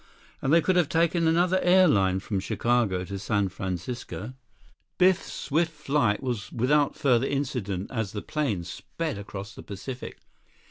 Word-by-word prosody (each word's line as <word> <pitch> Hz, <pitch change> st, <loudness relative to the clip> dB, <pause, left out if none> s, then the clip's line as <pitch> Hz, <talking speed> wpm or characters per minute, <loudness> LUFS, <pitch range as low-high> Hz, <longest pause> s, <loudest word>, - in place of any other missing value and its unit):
And 135 Hz, -, 0 dB
they 165 Hz, +1 st, +6 dB
could 185 Hz, +2 st, +2 dB
have 170 Hz, -4 st, +3 dB
taken 170 Hz, 0 st, +2 dB
another 175 Hz, +3 st, +3 dB
airline 145 Hz, -, +4 dB
from 100 Hz, 0 st, -2 dB
Chicago 105 Hz, -3 st, 0 dB
to 100 Hz, +1 st, -5 dB
San 100 Hz, -1 st, 0 dB
Francisco. 100 Hz, +6 st, -5 dB, 0.6 s
Biff's 185 Hz, 0 st, +3 dB
swift 165 Hz, +3 st, 0 dB
flight 140 Hz, -7 st, 0 dB
was 120 Hz, -5 st, -3 dB
without 140 Hz, +4 st, +2 dB
further 130 Hz, -1 st, +2 dB
incident 115 Hz, -9 st, -2 dB
as 110 Hz, -6 st, -2 dB
the 105 Hz, -, -5 dB
plane 130 Hz, -, -1 dB
sped 150 Hz, -, -5 dB
across 100 Hz, 0 st, -7 dB
the -, -, -10 dB
Pacific. 120 Hz, +6 st, -7 dB
125 Hz, 145 wpm, -27 LUFS, 100-155 Hz, 0.6 s, they